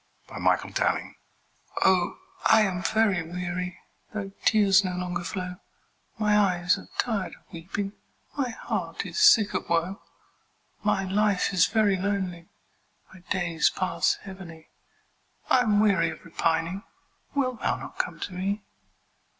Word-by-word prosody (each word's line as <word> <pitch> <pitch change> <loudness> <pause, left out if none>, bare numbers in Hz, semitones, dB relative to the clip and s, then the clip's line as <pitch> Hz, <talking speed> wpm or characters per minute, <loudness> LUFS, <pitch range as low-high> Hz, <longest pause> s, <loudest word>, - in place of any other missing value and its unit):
Anne - - -6
Bronte - - +1
Appeal - - 0 0.7
OH, 185 -2 +3 0.3
I 220 0 +7
am 185 -4 0
very 215 -4 +2
weary, 180 +1 -4 0.3
Though 205 -2 -5
tears 200 -2 +5
no 185 -1 -2
longer 180 -1 -3
flow; 180 +1 -4 0.6
My 210 -1 +2
eyes 180 -3 +3
are - - -14
tired 220 -6 -1
of - - -24
weeping, 195 +4 -4 0.4
My 275 -4 0
heart 225 - -4
is - - -4
sick 235 - +6
of - - -3
woe; 170 +3 0 0.8
My 195 - +2
life 200 0 +1
is 180 -2 +5
very 210 -3 +2
lonely 185 -3 -2 0.6
My 190 - -13
days 170 -3 +2
pass 185 - 0
heavily, 175 -5 -11 0.8
I'm 225 -5 +4
weary 195 -6 +3
of 160 - -9
repining; 165 +3 0 0.5
Wilt 255 -4 0
thou - - 0
not - - -9
come - - -2
to 185 - -4
me? 200 +3 -2
190 Hz, 135 wpm, -26 LUFS, 180-210 Hz, 0.8 s, I